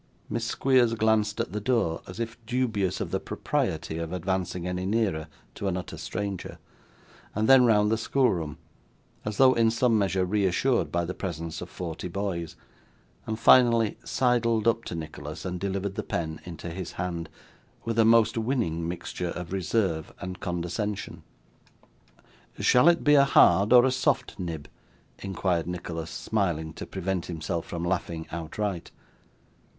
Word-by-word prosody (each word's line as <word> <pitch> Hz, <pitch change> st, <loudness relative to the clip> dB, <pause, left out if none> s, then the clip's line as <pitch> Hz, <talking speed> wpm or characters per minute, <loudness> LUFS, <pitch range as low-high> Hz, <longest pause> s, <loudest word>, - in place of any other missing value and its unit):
Miss 115 Hz, -, -1 dB
Squeers 120 Hz, -1 st, +3 dB
glanced 110 Hz, -1 st, +2 dB
at 115 Hz, -, -2 dB
the 105 Hz, -, -2 dB
door, 115 Hz, -9 st, +1 dB
as 90 Hz, +4 st, -9 dB
if 115 Hz, 0 st, -5 dB
dubious 115 Hz, -7 st, 0 dB
of -, -, -3 dB
the -, -, 0 dB
propriety 80 Hz, -, -2 dB
of 85 Hz, 0 st, -4 dB
advancing 90 Hz, -1 st, -2 dB
any 90 Hz, 0 st, -2 dB
nearer 100 Hz, -8 st, 0 dB, 0.3 s
to 100 Hz, -, -4 dB
an 95 Hz, -1 st, 0 dB
utter 90 Hz, -, -6 dB
stranger; 100 Hz, -3 st, -5 dB, 0.8 s
then 125 Hz, +5 st, +6 dB
round 105 Hz, -2 st, +4 dB
the 110 Hz, -, +1 dB
schoolroom, 90 Hz, -, 0 dB, 0.7 s
as 105 Hz, -1 st, -3 dB
though 130 Hz, -1 st, +7 dB
in 115 Hz, -2 st, +3 dB
some 115 Hz, 0 st, +2 dB
measure 95 Hz, -2 st, +1 dB
reassured 100 Hz, -, +1 dB
by 85 Hz, +1 st, 0 dB
the 90 Hz, -, -4 dB
presence 85 Hz, -4 st, -5 dB
of 90 Hz, -, -7 dB
forty 85 Hz, -1 st, -5 dB
boys; 85 Hz, -3 st, -3 dB, 0.7 s
and 110 Hz, -, -2 dB
finally 115 Hz, -2 st, +5 dB
sidled 115 Hz, -3 st, +1 dB
up 115 Hz, 0 st, +2 dB
to -, -, -5 dB
Nicholas 75 Hz, 0 st, -7 dB
and 90 Hz, -1 st, -3 dB
delivered 100 Hz, 0 st, -2 dB
the 105 Hz, -, -3 dB
pen 80 Hz, -5 st, -4 dB
into 85 Hz, -1 st, -7 dB
his 90 Hz, 0 st, -6 dB
hand, 85 Hz, -2 st, -4 dB, 0.6 s
with 115 Hz, 0 st, -1 dB
a -, -, +7 dB
most 115 Hz, 0 st, +5 dB
winning 110 Hz, -9 st, -1 dB
mixture 85 Hz, 0 st, -4 dB
of 90 Hz, +1 st, -6 dB
reserve 95 Hz, -3 st, 0 dB
and 90 Hz, -1 st, -6 dB
condescension. 90 Hz, +4 st, -3 dB, 1.4 s
'Shall 125 Hz, +6 st, +5 dB
it 170 Hz, -1 st, +2 dB
be 145 Hz, -, +5 dB
a 140 Hz, -1 st, +7 dB
hard 100 Hz, -7 st, +5 dB
or 125 Hz, 0 st, +8 dB
a 130 Hz, -, +3 dB
soft 130 Hz, -2 st, 0 dB
nib?' 80 Hz, -5 st, -5 dB, 0.5 s
inquired 90 Hz, -4 st, -1 dB
Nicholas, 85 Hz, -2 st, -5 dB
smiling 85 Hz, -7 st, -1 dB
to -, -, -8 dB
prevent 95 Hz, -2 st, -3 dB
himself 85 Hz, 0 st, -3 dB
from 85 Hz, 0 st, -4 dB
laughing 85 Hz, -2 st, -2 dB
outright. 85 Hz, +3 st, -3 dB
95 Hz, 155 wpm, -27 LUFS, 85-115 Hz, 1.4 s, or